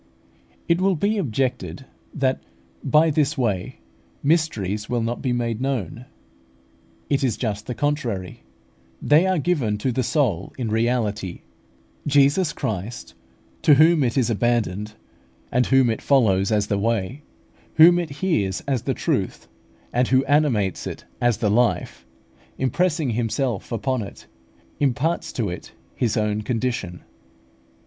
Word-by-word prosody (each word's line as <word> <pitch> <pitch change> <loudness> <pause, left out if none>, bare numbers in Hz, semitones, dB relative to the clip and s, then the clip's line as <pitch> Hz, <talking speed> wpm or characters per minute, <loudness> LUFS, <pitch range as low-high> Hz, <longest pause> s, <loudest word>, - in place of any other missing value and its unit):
It 170 +2 +2
will 190 0 +3
be 205 +6 0
objected 125 - -2 0.3
that, 130 -2 0 0.4
by 155 +1 +4
this 150 +1 +1
way, 105 -8 -1 0.5
mysteries 110 - 0
will 120 -2 0
not 120 +1 -3
be 130 - -1
made 120 -1 -1
known. 125 -3 -3 1.0
It 140 -1 0
is 120 -5 0
just 105 -3 -3
the 125 - -4
contrary; 125 -11 -2 0.6
they 155 +6 +4
are 185 -1 +2
given 140 -10 0
to 125 +5 -1
the 130 - 0
soul 115 - 0
in 120 -4 -2
reality. 110 -5 -1 0.7
Jesus 145 +5 +3
Christ, 110 +3 -5 0.5
to 150 - +6
whom 160 +1 +5
it 120 +1 0
is 120 -3 +2
abandoned, 110 -2 0 0.6
and 125 +1 +2
whom 135 -2 +4
it 110 - -4
follows 100 -8 +3
as 105 -1 +2
the 100 -1 -1
Way, 115 +4 -1 0.5
whom 175 +2 +7
it 170 -2 -3
hears 140 - -1
as 135 -4 -1
the - - -2
Truth, - - -2 0.5
and 125 +1 +2
who 130 0 +3
animates 130 - +1
it - - -7 0.2
as 120 -2 +2
the 105 -4 0
Life, 120 +2 0 0.5
impressing 155 +2 0
Himself 115 0 -2
upon 120 +2 -1
it, 100 - -9 0.5
imparts 145 +5 0
to 115 -4 -1
it 90 - -8 0.2
His 120 -2 0
own 105 0 0
condition. 115 -7 -3
125 Hz, 140 wpm, -23 LUFS, 110-145 Hz, 1.0 s, whom